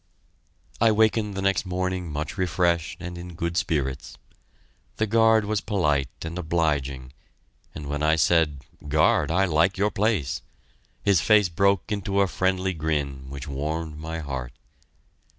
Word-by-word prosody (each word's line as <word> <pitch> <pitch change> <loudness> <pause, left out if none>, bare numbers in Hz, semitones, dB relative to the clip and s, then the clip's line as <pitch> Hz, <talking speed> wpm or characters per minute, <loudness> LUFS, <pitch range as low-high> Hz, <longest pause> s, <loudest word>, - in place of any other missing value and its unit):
I 115 -1 +6
wakened 110 -1 +2
the 95 - -3
next 95 -1 +2
morning 90 -2 -3
much 75 +1 -4
refreshed 85 -3 0
and 90 0 -6
in 90 -1 -9
good 85 0 -3
spirits. 70 -6 -2 0.8
The 110 - 0
guard 110 0 +4
was 105 -1 -1
polite 75 - 0
and 85 +2 -5
obliging, 75 -6 -1 0.6
and 75 - -7
when 75 +1 -3
I 80 +1 +3
said, 80 -3 +2 0.3
"Guard, 75 +1 +3
I 95 +4 +3
like 85 +2 +2
your 105 +2 +1
place," 100 - 0 0.6
his 100 -5 +4
face 105 +5 +4
broke 100 +2 +1
into 100 -1 0
a 100 - +3
friendly 95 +1 0
grin 70 -5 -3
which 70 -1 -7
warmed 75 +3 -4
my 80 +1 -5
heart. 65 -4 -5
85 Hz, 145 wpm, -25 LUFS, 75-95 Hz, 0.8 s, I